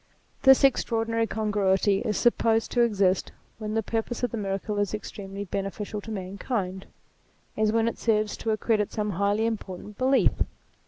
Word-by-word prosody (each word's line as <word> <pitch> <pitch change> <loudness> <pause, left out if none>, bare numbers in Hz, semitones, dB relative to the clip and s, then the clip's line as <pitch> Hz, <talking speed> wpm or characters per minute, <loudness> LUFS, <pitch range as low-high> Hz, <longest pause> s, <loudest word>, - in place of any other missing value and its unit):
This 265 0 +7
extraordinary 230 -3 +2
congruity 205 -2 +1
is 210 -2 -1
supposed 225 -1 +2
to 245 - +2
exist 195 -5 +2 0.3
when 215 0 -4
the 225 - +1
purpose 230 +3 -3
of 245 - +1
the 235 - -3
miracle 200 0 -2
is 205 +1 0
extremely 200 -1 -7
beneficial 200 +2 -4
to 225 - -10
mankind, 190 -1 -4 0.7
as 215 0 +2
when 225 0 +2
it 230 - -3
serves 215 -2 +1
to 225 - -4
accredit 215 -1 +1
some 210 -1 -2
highly 200 +4 +1
important 210 -2 -5
belief. 265 +1 +4
215 Hz, 155 wpm, -26 LUFS, 200-225 Hz, 0.7 s, This